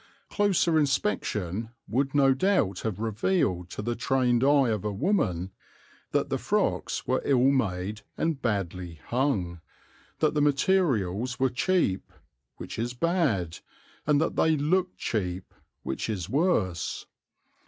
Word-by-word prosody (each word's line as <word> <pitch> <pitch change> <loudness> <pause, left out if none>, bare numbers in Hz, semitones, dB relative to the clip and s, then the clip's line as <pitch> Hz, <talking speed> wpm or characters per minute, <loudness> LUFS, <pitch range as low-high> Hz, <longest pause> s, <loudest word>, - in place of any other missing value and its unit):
Closer 185 -5 +2
inspection 105 - -1 0.2
would 135 +4 0
no 135 -2 +5
doubt 130 - +1
have 110 -5 -3
revealed 110 - 0
to 105 - -6
the 120 +2 -1
trained 125 -1 +1
eye 140 -2 +4
of 105 -4 -1
a 105 - -1
woman 95 - 0 0.6
that - - 0
the - - -1
frocks - - -1
were - - +1
ill 135 -1 +4
made 105 -5 -1 0.2
and 160 -4 -1
badly 90 -5 -2
"hung," 105 - 0 0.6
that 155 -1 +2
the 150 - +1
materials 135 - +1
were 130 -1 +2
cheap, 130 - 0 0.5
which - - -7
is 120 +2 -2
bad, 125 - 0 0.5
and 150 -1 +4
that 160 - 0
they 160 -1 +3
looked 180 +5 0
cheap, 90 -4 -3 0.3
which 65 - -3
is 95 -6 -3
worse. 130 - 0
125 Hz, 130 wpm, -27 LUFS, 95-150 Hz, 0.6 s, no